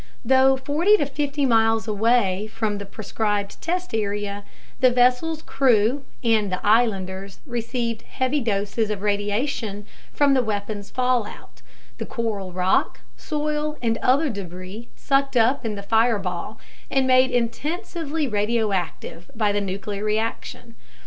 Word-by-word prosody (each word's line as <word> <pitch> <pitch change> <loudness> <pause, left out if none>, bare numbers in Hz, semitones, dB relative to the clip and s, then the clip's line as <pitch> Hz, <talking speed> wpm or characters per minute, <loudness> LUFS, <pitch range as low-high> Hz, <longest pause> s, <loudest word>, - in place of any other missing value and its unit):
Though 265 +2 +5
40 310 +10 +3
to 290 - 0
50 285 0 -1
miles 225 -2 +3
away 215 -2 +2
from 215 -3 -2
the 200 - -7
proscribed 205 -1 -3
test 360 -1 -2
area, 205 -1 -2 0.4
the 255 - +6
vessel's 250 +6 +2
crew 255 +1 +2 0.2
and 220 -4 +2
the 185 - -1
islanders 195 -4 +1
received 235 -2 -3
heavy 260 +4 -1
doses 215 -1 -1
of 210 -2 -3
radiation 205 +1 -1 0.3
from 285 -1 +3
the 260 - +4
weapon's 205 -2 -4
"fallout" 250 -4 -2 0.4
the - - -4
coral 215 -6 -3
rock, 180 +1 +1
soil, 300 0 -2
and 225 -2 0
other 280 +3 +2
debris 190 +3 -8
sucked 275 -1 +1
up 245 +5 +3
in 220 -2 -2
the 200 - -7
fireball 215 -3 0 0.3
and 270 -1 +2
made 255 0 +5
intensively 300 - -2
radioactive 205 -6 -2
by 215 -2 +2
the 205 0 0
nuclear 200 +1 -4
reaction. 225 +2 -3
225 Hz, 130 wpm, -23 LUFS, 205-260 Hz, 0.4 s, the